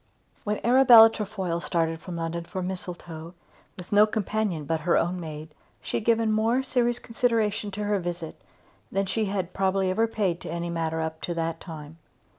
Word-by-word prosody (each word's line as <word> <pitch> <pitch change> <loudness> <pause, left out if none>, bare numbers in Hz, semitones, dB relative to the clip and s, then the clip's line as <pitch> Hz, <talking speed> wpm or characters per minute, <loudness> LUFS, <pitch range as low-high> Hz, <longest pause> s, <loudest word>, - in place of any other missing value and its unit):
When 210 0 -1
Arabella 240 -3 +8
Trefoil 190 -6 -3
started 165 -1 -1
from 180 +1 -7
London 170 0 -3
for 185 +1 -5
Mistletoe, 175 -2 -7 0.4
with 180 -1 -10
no 210 +1 +6
companion 210 -6 -2
but 160 +2 -1
her 170 +3 +2
own 180 +2 0
maid, 155 -2 -7 0.3
she - - -3
had 220 - -5
given 225 -1 +3
more 225 +4 +2
serious 240 -2 +1
consideration 225 -4 0
to 205 +1 -5
her 205 -1 +1
visit 175 -2 -6 0.5
than 195 +1 0
she 220 +3 -1
had 190 -3 -3
probably 190 -1 +1
ever 225 +5 +2
paid 195 -6 -1
to - - -7
any 170 0 -3
matter 160 -1 -2
up 160 0 -4
to 175 - -3
that 165 0 -2
time. 160 -2 -10
185 Hz, 180 wpm, -26 LUFS, 165-215 Hz, 0.5 s, Arabella